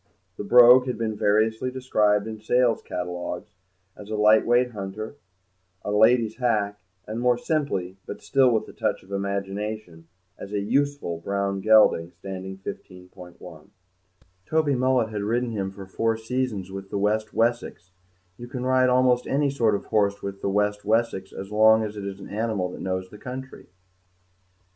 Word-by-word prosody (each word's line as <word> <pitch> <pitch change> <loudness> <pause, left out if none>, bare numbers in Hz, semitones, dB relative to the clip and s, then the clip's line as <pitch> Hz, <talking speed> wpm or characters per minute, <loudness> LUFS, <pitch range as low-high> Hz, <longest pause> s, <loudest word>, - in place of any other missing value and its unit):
The - - -6
Brogue 125 +3 +7
had 125 - -2
been 110 -2 -2
variously 110 +4 +1
described 105 -5 +1
in 110 -1 -7
sale 120 +1 +2
catalogues 90 0 -6 0.4
as 105 0 -12
a 110 - -2
light 105 +1 +4
weight 120 +1 +3
hunter, 105 +2 -6 0.7
a 105 - -2
lady's 110 +1 +3
hack, 105 -5 0 0.3
and, 110 +2 -5
more 125 0 +2
simply, 120 - -2
but - - -7
still 135 -2 +3
with 110 -3 0
a - - -12
touch - - -2
of 95 - -18
imagination, 100 -2 -4 0.3
as 100 - -8
a 105 - 0
useful 140 -5 -1
brown 100 +1 -2
gelding, 105 -6 +4
standing 95 +1 -7
15.1. 90 -3 -11 0.8
Toby 155 -2 +1
Mullet 130 -2 +1
had 105 -2 -4
ridden 120 +3 -1
him 100 -3 -3
for 95 0 -10
four 115 +4 -1
seasons 110 -5 -3
with 95 0 -8
the - - -3
West 105 +2 0
Wessex; 115 -5 -1 0.5
you 120 - -9
can 125 0 -5
ride 130 0 +3
almost 125 -1 +3
any 140 0 +1
sort 115 -6 +2
of - - -5
horse 100 -1 0
with 100 0 -6
the - - -1
West 105 +1 0
Wessex 110 -3 0
as 95 +1 -8
long 110 +1 +5
as 105 -1 -5
it 100 -1 -6
is 100 0 -7
an 100 - -10
animal 105 -4 -2
that - - -9
knows 95 0 -3
the 105 - -12
country. 130 +2 -8
105 Hz, 165 wpm, -25 LUFS, 100-120 Hz, 0.8 s, Brogue